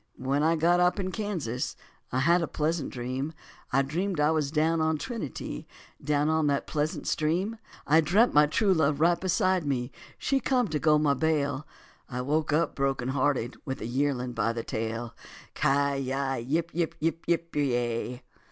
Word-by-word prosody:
When 135 +3 0
I 160 +2 +3
got 170 +2 +3
up 180 +3 +3
in 185 -1 -2
Kansas, 175 - -3 0.4
I 130 - +1
had 170 +5 +4
a 165 - -1
pleasant 155 -1 -1
dream; 130 +5 -4 0.4
I 135 +2 +3
dreamed 175 +5 -2
I 150 +1 +4
was 155 -3 0
down 160 +2 +1
on 160 0 +1
Trinity, 220 - -5 0.4
down 145 0 +1
on 160 -1 +2
that 140 -1 +1
pleasant 150 0 -2
stream; 180 +8 0 0.3
I 160 +3 +5
dreampt 200 +10 +3
my 150 0 +6
true 195 +6 +2
love 150 -4 +2
right 170 +2 +3
beside 185 0 +2
me, 130 -3 -2 0.3
she 275 - +1
come 255 -3 +1
to 150 - -1
go 155 0 +4
my 150 -2 +3
bail; 145 -1 0 0.4
I 125 0 -3
woke 150 +4 0
up 160 +3 +2
broken 135 -2 -1
hearted 130 -2 0
with 135 -1 -4
a - - -5
yearling 125 0 -1
by 115 0 0
the 115 -1 -4
tail. 115 +1 -4 0.4
Ci 140 0 +2
yi 135 0 -1
yip 160 +8 -1
yip 165 -1 -1
yip 165 +1 -1
pe 120 -5 0
ya. - - -19
150 Hz, 180 wpm, -28 LUFS, 135-165 Hz, 0.4 s, my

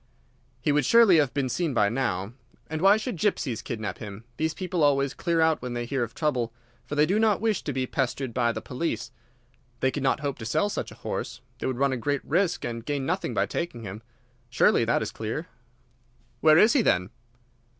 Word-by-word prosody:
He 145 - +1
would 145 0 +3
surely 225 - +6
have 145 -5 +3
been 140 -2 -1
seen 140 +3 -1
by 105 -3 +4
now. 100 -3 -2 0.4
And 160 0 -2
why 195 +3 +6
should 220 -2 -4
gypsies 155 - 0
kidnap 110 -4 -4
him? 105 0 -8
These 160 0 -1
people 180 -2 -2
always 140 -1 +3
clear 170 -2 0
out 160 -1 +3
when 125 -1 -4
they 120 0 -2
hear 135 +1 -2
of 115 -1 -3
trouble, 130 -7 0 0.4
for 145 - -4
they 150 +1 +4
do 195 +7 +1
not 220 -3 +3
wish 220 -2 0
to 145 - -3
be 130 -1 -1
pestered 130 -1 -2
by 120 -1 +2
the - - -6
police. 125 -4 -3 0.7
They 130 - +2
could 145 - -4
not 135 +1 +1
hope 140 -4 -3
to 110 - -6
sell 205 - +1
such - - -4
a - - -11
horse. 125 - -4 0.2
They - - -2
would 130 -2 -2
run 140 0 +2
a - - -1
great 140 +3 -2
risk 175 +3 +1
and 115 -1 -4
gain 140 0 -2
nothing 180 +5 -2
by - - +2
taking 145 -9 -4
him. 100 +1 -7 0.5
Surely 120 -1 +3
that 115 -1 +1
is 110 - -4
clear." 115 +9 -4 0.9
"Where 155 -1 +6
is 215 +7 +6
he, 280 - +4
then?" 90 - +1
140 Hz, 215 wpm, -26 LUFS, 120-165 Hz, 0.9 s, surely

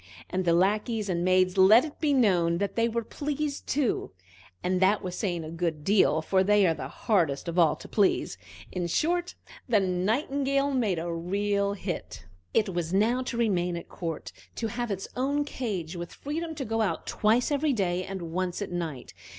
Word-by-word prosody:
And 185 0 -1
the 170 - +4
lackeys 210 +4 +1
and 175 -1 0
maids 185 +1 +3
let 215 +8 +7
it 305 - -9
be 305 -2 +1
known 180 -10 +3
that 200 +2 -2
they 230 0 +2
were 230 0 -2
pleased 290 +3 -4
too; 265 - 0 0.5
and 185 0 +1
that 200 +3 +3
was 180 -1 -4
saying 175 -6 -2
a 155 - -7
good 165 -3 -2
deal, 160 -5 +3
for 190 +3 +2
they 205 0 +4
are 165 - +3
the - - -6
hardest 170 -9 0
of 170 +1 -1
all 160 -3 +5
to - - -12
please. 200 - +1 0.4
In 180 -2 -2
short, 350 - 0 0.3
the 220 -3 +5
Nightingale 270 - 0
made 220 -9 +1
a 170 +1 -3
real 200 +4 0
hit. 105 - -6 0.3
It 215 -3 +2
was 175 -2 -2
now 220 +6 +2
to 245 -2 -4
remain 180 -7 +1
at 170 - -9
court, 165 -3 -5 0.2
to 225 - -2
have 240 +1 -3
its 195 -1 -3
own 285 +3 0
cage, 195 - -4
with 175 0 -6
freedom 320 +3 -4
to 280 -3 -4
go 225 +1 -1
out 215 - -1
twice 225 +6 +2
every 290 +1 +2
day 185 -6 0
and 190 -1 -6
once 180 0 -2
at 195 - -7
night. 165 -7 -5
195 Hz, 190 wpm, -27 LUFS, 175-235 Hz, 0.5 s, let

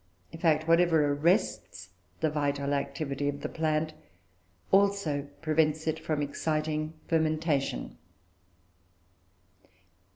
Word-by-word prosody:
In 165 - -9
fact, 155 -2 +2
whatever 165 -3 +4
arrests 150 - 0 0.3
the 155 -2 +2
vital 145 -1 -1
activity 140 0 -2
of 145 0 -5
the - - -2
plant 155 -1 -1 0.8
also 195 -8 +2 0.2
prevents 155 0 +1
it 160 0 -1
from 150 -2 -1
exciting 155 +1 -2
fermentation. 155 - 0
155 Hz, 95 wpm, -29 LUFS, 145-160 Hz, 0.8 s, whatever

